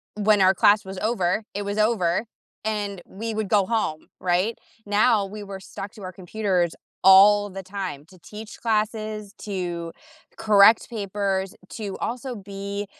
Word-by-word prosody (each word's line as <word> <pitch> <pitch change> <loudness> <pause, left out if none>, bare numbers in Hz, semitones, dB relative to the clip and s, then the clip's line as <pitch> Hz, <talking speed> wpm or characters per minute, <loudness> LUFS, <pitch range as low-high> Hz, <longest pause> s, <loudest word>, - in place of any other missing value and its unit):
when 210 -1 +3
our 190 0 +6
class 205 +2 +4
was 190 0 -7
over, 215 -2 0
it 205 - -2
was 205 +1 -3
over, 210 -3 +2 0.4
and 205 -3 -2
we 225 +3 -5
would 215 -1 -2
go 200 -1 +3
home, 215 -8 -2
right? 185 +5 0 0.3
Now 205 0 +3
we 210 +2 -8
were 195 -1 -7
stuck 195 +1 -8
to 205 - -12
our 185 - -5
computers 185 -2 -1 0.3
all 205 +2 +7
the 195 0 -8
time 185 -7 -6
to 185 - -17
teach 210 +4 -10
classes, 215 -2 -2
to 175 -4 -4 0.5
correct 215 +1 +5
papers, 200 -3 -2
to 205 -4 -6
also 250 +1 -4
be, 200 0 -5
200 Hz, 150 wpm, -24 LUFS, 190-215 Hz, 0.5 s, all